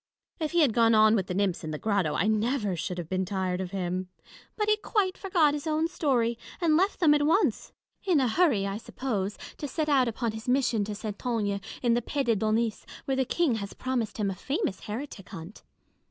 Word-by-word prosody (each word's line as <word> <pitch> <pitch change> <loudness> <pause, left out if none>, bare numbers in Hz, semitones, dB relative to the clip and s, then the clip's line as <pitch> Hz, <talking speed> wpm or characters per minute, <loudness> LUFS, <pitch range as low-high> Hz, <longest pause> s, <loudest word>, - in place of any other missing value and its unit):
If 310 -1 -2
he 345 - +4
had 275 -7 +4
gone 230 -1 +4
on 215 0 +6
with 190 -3 0
the 180 - -3
nymphs 195 -3 0
in 155 - -4
the 155 - -3
grotto, 195 -5 0
I 180 - +1
never 215 -1 +1
should 180 +1 -4
have 175 -3 -5
been 185 +2 -1
tired 185 -1 -2
of 185 - -4
him; 185 -1 -3 0.5
but 425 -1 0
he 425 - +5
quite 410 -3 0
forgot 345 -7 +2
his 295 +2 -4
own 315 +1 +1
story, 250 -9 0 0.2
and 330 -4 +3
left 380 +5 +2
them 315 -4 +5
at 295 - +3
once; 385 +7 +1 0.3
in 360 -6 +3
a 260 - +2
hurry 240 - +2
(I 200 0 -2
suppose) 215 -4 -3 0.2
to 295 - -4
set 305 +2 -2
out 265 -4 +4
upon 230 0 -2
his 220 +3 -6
mission 250 -5 +2
to 210 0 -5
Saintonge 205 -1 -2 0.2
in 240 -1 +3
the 240 - +2
pays 275 +3 -2
de 230 -2 +3
d'Aunis, 220 +2 0 0.2
where 270 - 0
the 265 - +2
King 290 -5 +1
has 200 - -6
promised 245 -5 -2
him 205 -3 0
a - - -5
famous 280 - -2
heretic 215 -2 -7
hunt. 185 0 -9
230 Hz, 220 wpm, -28 LUFS, 200-295 Hz, 0.5 s, on